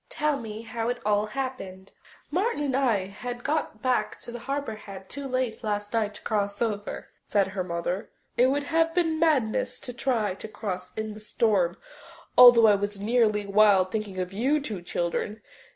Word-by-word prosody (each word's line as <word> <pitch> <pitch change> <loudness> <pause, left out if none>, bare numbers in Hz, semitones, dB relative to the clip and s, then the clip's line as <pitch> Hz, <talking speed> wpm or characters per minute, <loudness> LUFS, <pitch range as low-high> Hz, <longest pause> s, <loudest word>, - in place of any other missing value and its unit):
Tell 300 -2 0
me 220 -1 -7
how 230 0 -3
it 245 - -1
all 210 0 +2
happened." 210 -7 -5 0.4
"Martin 370 -1 0
and 270 -3 0
I 205 -8 +1 0.3
got 285 -7 -2
back 255 -1 0
to 240 0 -7
Harbour 275 0 -3
Head 195 -3 -10
too 280 -1 -5
late 255 -3 -2
last 205 0 -2
night 215 -2 0
to - - -11
cross 200 -1 -1
over," 210 -3 -3
said 200 -2 +1
her 190 -1 -3
mother. 175 +2 -3 0.3
"It 250 - +5
would 280 +2 +1
have 330 +2 +1
been 325 -3 +1
madness 285 -10 +1
to 250 - -6
try 235 -5 0
to 195 - -8
cross 195 -4 -5
in 220 -1 -3
the 210 - -10
storm, 210 -5 +1 0.6
although 245 -2 +9
I 210 - +7
was 205 0 -2
nearly 210 -1 +2
wild 200 -2 +4
thinking 210 -3 -3
of 185 0 -3
you 265 +9 +2
two 215 -10 -5
children. 175 +5 -3
220 Hz, 175 wpm, -27 LUFS, 200-255 Hz, 0.6 s, although